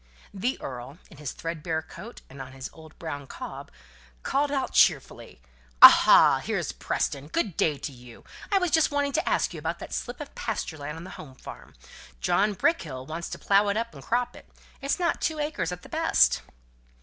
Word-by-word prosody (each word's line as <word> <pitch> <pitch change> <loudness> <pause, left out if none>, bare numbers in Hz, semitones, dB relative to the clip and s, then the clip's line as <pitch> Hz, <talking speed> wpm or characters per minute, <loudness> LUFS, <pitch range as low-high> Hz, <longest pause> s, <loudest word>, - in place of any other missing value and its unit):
The 240 +7 -2
earl, 130 +3 -7
in 155 - -14
his 150 -3 -5
thread 165 -1 -5
bare 160 -1 -2
coat, 200 +8 -11
and 135 0 -10
on 130 0 -9
his 135 0 -7
old 160 -1 -15
brown 145 -4 -6
cob, - - -8 0.5
called 285 +1 0
out 270 -2 -1
cheerfully, - - +2 0.4
"Aha! - - +9
here's - - -2
Preston. 140 +1 -2
Good 180 +3 -1
day 150 -3 +1
to 145 - -6
you. 120 -2 -14 0.3
I 400 - +4
was 360 -3 0
just 320 -2 +4
wanting 285 -1 0
to 320 +6 0
ask - - +1
you - - -6
about - - -3
that - - -9
slip 245 - -4
of 295 - -8
pasture 205 -8 -4
land 150 +2 -6
on 165 - -8
the 185 - -9
Home 135 -4 -13
Farm. - - -12 0.4
John 205 - +2
Brickkill 150 - -1
wants 165 +4 -5
to - - -6
plough 200 +1 +3
it 200 - 0
up 230 +1 -3
and - - -11
crop 245 +1 -1
it. - - -15 0.3
It's 275 +4 -1
not 345 -1 0
two 315 - 0
acres 295 -8 -2
at 180 0 -7
the - - -11
best." - - +3
175 Hz, 200 wpm, -26 LUFS, -, 0.5 s, Aha